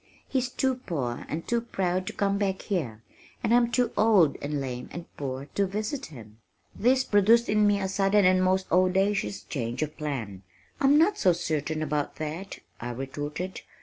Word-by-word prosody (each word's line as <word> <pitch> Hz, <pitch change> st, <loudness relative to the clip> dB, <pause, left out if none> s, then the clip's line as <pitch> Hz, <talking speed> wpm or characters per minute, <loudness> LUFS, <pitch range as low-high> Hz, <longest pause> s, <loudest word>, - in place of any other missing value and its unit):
He's 255 Hz, -2 st, 0 dB
too 260 Hz, +1 st, 0 dB
poor 140 Hz, -, -4 dB
and 165 Hz, +2 st, -4 dB
too 235 Hz, -1 st, +1 dB
proud 185 Hz, -5 st, -2 dB
to -, -, -4 dB
come 200 Hz, 0 st, 0 dB
back 195 Hz, -2 st, -1 dB
here, 130 Hz, -, -3 dB, 0.4 s
and 230 Hz, -, +2 dB
I'm 240 Hz, -1 st, +4 dB
too 250 Hz, -1 st, +1 dB
old 205 Hz, -8 st, +4 dB
and 145 Hz, 0 st, -2 dB
lame 125 Hz, -2 st, -5 dB
and 170 Hz, 0 st, -7 dB
poor 135 Hz, -1 st, -4 dB
to 200 Hz, -1 st, +1 dB
visit 215 Hz, +8 st, -3 dB
him." 110 Hz, -6 st, -13 dB, 0.4 s
This 255 Hz, +3 st, +3 dB
produced 225 Hz, +2 st, +4 dB
in 210 Hz, 0 st, +3 dB
me 205 Hz, -1 st, +3 dB
a 190 Hz, -, -1 dB
sudden 195 Hz, +1 st, +3 dB
and 185 Hz, 0 st, +4 dB
most 185 Hz, 0 st, +2 dB
audacious 190 Hz, +2 st, +2 dB
change 120 Hz, -1 st, -3 dB
of 150 Hz, 0 st, -5 dB
plan. 120 Hz, -11 st, -4 dB, 0.4 s
"I'm 280 Hz, +1 st, +5 dB
not 375 Hz, +6 st, +3 dB
so 180 Hz, -, +4 dB
certain 155 Hz, -2 st, -2 dB
about 150 Hz, -2 st, -2 dB
that," 155 Hz, +5 st, -5 dB, 0.2 s
I 120 Hz, -, -5 dB
retorted. 145 Hz, +8 st, -5 dB
185 Hz, 180 wpm, -27 LUFS, 145-210 Hz, 0.4 s, I'm